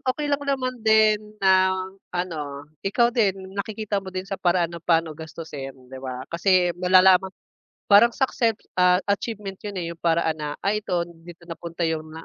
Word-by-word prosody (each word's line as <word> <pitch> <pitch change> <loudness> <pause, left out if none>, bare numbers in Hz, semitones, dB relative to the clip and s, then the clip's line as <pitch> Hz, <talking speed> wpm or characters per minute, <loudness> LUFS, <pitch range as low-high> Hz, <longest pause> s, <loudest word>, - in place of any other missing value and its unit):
okey 290 +3 -2
lang 285 - +1
naman 255 -3 -1
din 215 -1 +3
na 190 -1 +4 0.3
ano, 150 -6 -4 0.2
ikaw 235 +4 +2
din 195 -4 0
nakikita 205 0 -3
mo 190 - -10
din 185 0 -5
sa 195 0 -6
paraan 175 -1 +1
na 170 - -7
pa'no 165 -1 +1
gastusin, 155 -3 -8 0.2
'di 130 - -7
ba? 130 -1 -6
Kasi 180 +1 +2
malalaman 185 +1 +5 0.6
parang 230 +3 +5
succeps 230 -4 0 0.2
ah, 180 0 +6
achievement 200 -1 -3
'yun, 205 -2 -6
eh, 175 - -2
'yung 170 - -16
paraan 165 -2 +1
na, 150 - -3 0.2
ay 210 +2 +1
ito 180 -4 -1 0.2
dito 170 0 -13
napunta 170 0 -5
'yung 160 -1 -2
na 160 - -9
185 Hz, 170 wpm, -24 LUFS, 170-210 Hz, 0.6 s, ah